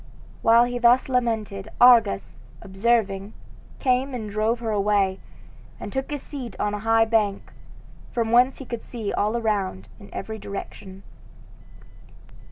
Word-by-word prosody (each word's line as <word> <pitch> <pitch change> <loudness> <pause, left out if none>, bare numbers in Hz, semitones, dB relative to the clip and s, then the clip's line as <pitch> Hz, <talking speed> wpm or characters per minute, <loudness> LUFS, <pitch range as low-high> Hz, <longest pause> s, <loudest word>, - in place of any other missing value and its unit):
While 230 +1 +6
he 245 0 -2
thus 240 +3 +4
lamented, 220 -5 -1
Argus, 230 - +4 0.2
observing, 200 0 0 0.4
came 255 0 0
and 215 -4 -5
drove 215 +3 0
her 230 -1 -3
away, 200 -2 +1 0.6
and - - -7
took 265 0 -3
his 290 -2 -5
seat 265 -5 -8
on 210 0 -1
a 210 - -3
high 225 +1 +3
bank, 215 -3 -1 0.6
from 230 -2 -1
whence 250 +2 +4
he 270 - -9
could 235 -2 -5
see 225 -4 -5
all 215 +3 0
around 195 - -2
in 200 - -13
every 220 0 -6
direction. 195 -1 -8
225 Hz, 140 wpm, -24 LUFS, 200-240 Hz, 0.6 s, While